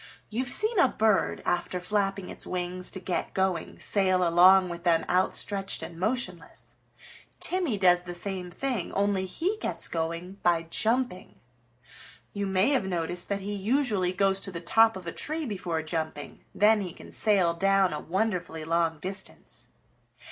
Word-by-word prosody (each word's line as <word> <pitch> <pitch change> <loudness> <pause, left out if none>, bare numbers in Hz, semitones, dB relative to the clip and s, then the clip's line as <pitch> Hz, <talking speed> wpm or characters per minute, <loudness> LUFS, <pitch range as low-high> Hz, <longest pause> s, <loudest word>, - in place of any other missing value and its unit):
You've 245 +3 -2
seen 430 - +3
a 350 - +6
bird, 220 -4 +1
after 175 +1 -1
flapping 195 0 -1
its - - -7
wings 180 0 -2
to 190 - -6
get 180 -1 -3
going, 190 -3 -1
sail 185 -3 +2
along 185 +2 +6
with 170 0 -6
them 170 -2 +2
outstretched 195 +2 0
and 165 -1 -8
motionless. 185 -6 -3 0.6
Timmy 355 - 0
does 180 -2 +4
the 175 0 -7
same 185 0 -5
thing, 240 0 -3
only 200 -1 0
he 365 - -2
gets - - 0
going 170 +4 -4
by 170 -2 +2
jumping. 230 -4 -1 0.9
You 200 -1 -2
may 190 +4 +2
have 260 -8 +1
noticed 175 -1 -3
that 200 -1 -1
he 205 +2 -4
usually 205 -3 +1
goes 195 +1 +2
to 195 - -3
the 170 - -4
top 225 +5 +4
of 185 - -10
a 165 - -4
tree 310 - -3
before 180 - -3
jumping; 155 -3 -5
then 210 +1 +4
he 180 -4 -5
can - - -13
sail 195 -6 +2
down 195 0 +2
a 150 - -3
wonderfully 180 -4 -2
long 165 0 +1
distance. 190 +4 -7
190 Hz, 160 wpm, -27 LUFS, 175-205 Hz, 0.9 s, a